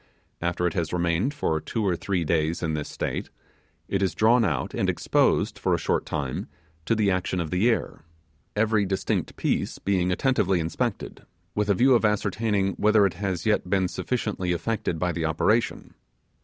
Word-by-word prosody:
After 85 Hz, +1 st, -1 dB
it 85 Hz, -, 0 dB
has 85 Hz, -3 st, -2 dB
remained 85 Hz, +7 st, +1 dB
for 80 Hz, -, -1 dB
two 110 Hz, +5 st, -2 dB
or 90 Hz, -3 st, +2 dB
three 90 Hz, 0 st, -1 dB
days 80 Hz, +1 st, 0 dB
in 80 Hz, -1 st, 0 dB
this 75 Hz, -1 st, -3 dB
state, -, -, -3 dB, 0.6 s
it 100 Hz, -, -1 dB
is 95 Hz, -4 st, 0 dB
drawn 115 Hz, +4 st, +4 dB
out, 75 Hz, -, -1 dB
and -, -, 0 dB
exposed, -, -, +1 dB
for -, -, +2 dB
a -, -, -1 dB
short -, -, -1 dB
time, 70 Hz, -4 st, -3 dB, 0.4 s
to 115 Hz, -, +3 dB
the 105 Hz, -3 st, +2 dB
action 90 Hz, 0 st, -1 dB
of 85 Hz, -3 st, -3 dB
the 95 Hz, +6 st, +3 dB
air, 115 Hz, -, -1 dB, 0.5 s
every 105 Hz, 0 st, +2 dB
distinct 95 Hz, -1 st, -2 dB
piece -, -, -1 dB
being 90 Hz, -2 st, 0 dB
attentively 95 Hz, -3 st, +2 dB
inspected, 80 Hz, 0 st, -3 dB, 0.3 s
with 105 Hz, 0 st, -1 dB
a 100 Hz, -, +4 dB
view 130 Hz, +6 st, +5 dB
of 120 Hz, -, +3 dB
ascertaining 105 Hz, -2 st, +1 dB
whether 105 Hz, -1 st, +4 dB
it 95 Hz, -, 0 dB
has 95 Hz, -1 st, -3 dB
yet 105 Hz, -4 st, +1 dB
been 95 Hz, -1 st, +2 dB
sufficiently 105 Hz, -4 st, -2 dB
affected 85 Hz, 0 st, -2 dB
by 90 Hz, +2 st, 0 dB
the 85 Hz, -2 st, -2 dB
operation. 105 Hz, +9 st, 0 dB
95 Hz, 180 wpm, -25 LUFS, 85-105 Hz, 0.6 s, view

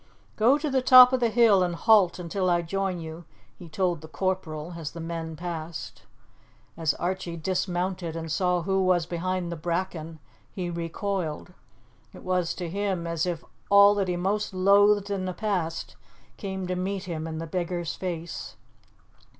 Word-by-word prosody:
"Go 245 Hz, +6 st, +4 dB
to 300 Hz, +1 st, -3 dB
the 265 Hz, -2 st, +1 dB
top 255 Hz, 0 st, +9 dB
of 260 Hz, -, +3 dB
the 235 Hz, -1 st, +2 dB
hill 220 Hz, -4 st, +5 dB
and 175 Hz, -1 st, 0 dB
halt 200 Hz, -3 st, +4 dB
until 180 Hz, +1 st, -1 dB
I 175 Hz, -1 st, +2 dB
join 190 Hz, +1 st, -2 dB
you," 160 Hz, +1 st, -8 dB, 0.4 s
he 175 Hz, -, -10 dB
told 175 Hz, 0 st, -1 dB
the 160 Hz, -, -10 dB
corporal 175 Hz, -2 st, -3 dB
as 160 Hz, -3 st, -6 dB
the 170 Hz, -, -8 dB
men 165 Hz, -1 st, -5 dB
passed. 165 Hz, -2 st, -7 dB, 0.7 s
As 160 Hz, -3 st, 0 dB
Archie 175 Hz, -1 st, -3 dB
dismounted 180 Hz, 0 st, -2 dB
and 165 Hz, -1 st, -5 dB
saw 180 Hz, +1 st, +1 dB
who 190 Hz, +1 st, +1 dB
was 180 Hz, -2 st, +2 dB
behind 180 Hz, +1 st, -2 dB
the -, -, -3 dB
bracken, 165 Hz, -1 st, -3 dB, 0.3 s
he 180 Hz, -2 st, -4 dB
recoiled. 170 Hz, 0 st, -3 dB, 0.6 s
It -, -, -12 dB
was 180 Hz, -2 st, 0 dB
to 180 Hz, -, -4 dB
him 190 Hz, -1 st, -2 dB
as 170 Hz, 0 st, -1 dB
if 170 Hz, -2 st, -3 dB, 0.2 s
all 200 Hz, 0 st, +8 dB
that 200 Hz, -2 st, 0 dB
he 180 Hz, -, 0 dB
most 195 Hz, +3 st, -1 dB
loathed 200 Hz, +2 st, +4 dB
in 190 Hz, -2 st, -2 dB
the 185 Hz, -1 st, -4 dB
past 180 Hz, -7 st, -2 dB, 0.4 s
came 190 Hz, -2 st, -5 dB
to 180 Hz, 0 st, -2 dB
meet 190 Hz, +1 st, -2 dB
him 165 Hz, -3 st, -4 dB
in 160 Hz, -1 st, -5 dB
the 165 Hz, -, -4 dB
beggar's 175 Hz, 0 st, -3 dB
face. 170 Hz, -3 st, -5 dB
180 Hz, 170 wpm, -26 LUFS, 165-195 Hz, 0.7 s, top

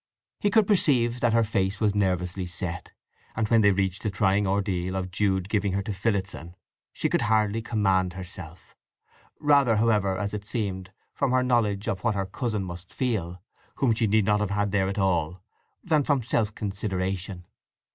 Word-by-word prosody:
He 205 Hz, -, +2 dB
could 220 Hz, 0 st, +4 dB
perceive 125 Hz, -, +2 dB
that 120 Hz, -1 st, +2 dB
her 115 Hz, 0 st, +4 dB
face 100 Hz, -2 st, -1 dB
was 105 Hz, -2 st, +2 dB
nervously 90 Hz, -2 st, -1 dB
set, 90 Hz, 0 st, -5 dB, 0.4 s
and 110 Hz, -1 st, 0 dB
when 115 Hz, -1 st, +5 dB
they 100 Hz, -, +5 dB
reached 95 Hz, -1 st, -1 dB
the 110 Hz, -, -1 dB
trying 100 Hz, 0 st, +1 dB
ordeal 95 Hz, -2 st, -1 dB
of 95 Hz, -1 st, -3 dB
Jude 95 Hz, -1 st, 0 dB
giving 100 Hz, -2 st, 0 dB
her 100 Hz, +1 st, -1 dB
to 105 Hz, -, -4 dB
Phillotson 95 Hz, -4 st, -3 dB, 0.4 s
she -, -, -1 dB
could -, -, +1 dB
hardly 110 Hz, 0 st, +1 dB
command 95 Hz, -5 st, +1 dB
herself; 90 Hz, -2 st, -9 dB, 0.6 s
rather, 140 Hz, -6 st, +4 dB
however, 105 Hz, -4 st, +2 dB
as 100 Hz, +2 st, -3 dB
it 105 Hz, -1 st, -4 dB
seemed, 95 Hz, -4 st, -4 dB, 0.2 s
from 140 Hz, -, 0 dB
her 130 Hz, 0 st, +3 dB
knowledge 110 Hz, -5 st, +1 dB
of 95 Hz, -2 st, -2 dB
what 115 Hz, -3 st, +1 dB
her 100 Hz, -1 st, -1 dB
cousin 105 Hz, +1 st, -3 dB
must 90 Hz, 0 st, -8 dB
feel, 90 Hz, -8 st, -2 dB, 0.3 s
whom 125 Hz, -4 st, +2 dB
she 110 Hz, 0 st, +1 dB
need 105 Hz, 0 st, +3 dB
not 105 Hz, +1 st, +2 dB
have 105 Hz, -2 st, -1 dB
had 105 Hz, 0 st, 0 dB
there 95 Hz, -1 st, +1 dB
at 100 Hz, -, -4 dB
all, 90 Hz, -2 st, 0 dB, 0.4 s
than 155 Hz, -5 st, +2 dB
from 140 Hz, -3 st, +1 dB
self 110 Hz, -2 st, 0 dB
consideration. 95 Hz, -2 st, -3 dB
100 Hz, 180 wpm, -26 LUFS, 95-110 Hz, 0.6 s, when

